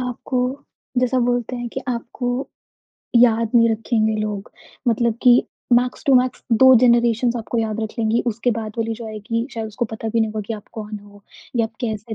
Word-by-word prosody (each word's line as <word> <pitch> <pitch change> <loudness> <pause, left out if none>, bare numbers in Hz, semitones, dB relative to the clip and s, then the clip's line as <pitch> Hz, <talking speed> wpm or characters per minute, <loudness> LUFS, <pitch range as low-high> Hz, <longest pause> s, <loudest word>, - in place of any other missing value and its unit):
आपको 250 +1 -3 0.6
जैसा 255 +1 +2
बोलते 245 0 0
हैं 240 0 -4
कि - - -5
आपको 245 +1 -3 0.9
याद 230 -2 +4
नहीं 230 -1 +6
रखेंगे 220 0 0
लोग 210 -2 -4 0.4
मतलब 235 0 +2
कि 245 -1 +6 0.4
मैक्स 250 +1 -4
टू 275 - +5
मैक्स 255 0 +2 0.2
2 260 0 +9
जनेरेशन्स 235 0 +3
आपको 235 +1 -3
याद 220 -1 -1
रख 220 - -2
लेंगी, 225 +1 +1
उसके 235 +1 0
बाद 215 -1 -5
वाली 225 0 -1
जो 230 0 -8
आएगी, 220 +2 -3
शायद 225 -1 -3
उसको 215 +2 -3
पता 220 0 -4
भी 230 +1 +1
नहीं 220 -1 +1
होगा 215 0 -3
कि 225 - -3
आप 210 - -11
कौन 210 0 -6
हो 205 0 -17 0.3
या 230 - +3
आप 225 0 -7
कैसे 220 -2 -3
230 Hz, 195 wpm, -21 LUFS, 220-245 Hz, 0.9 s, 2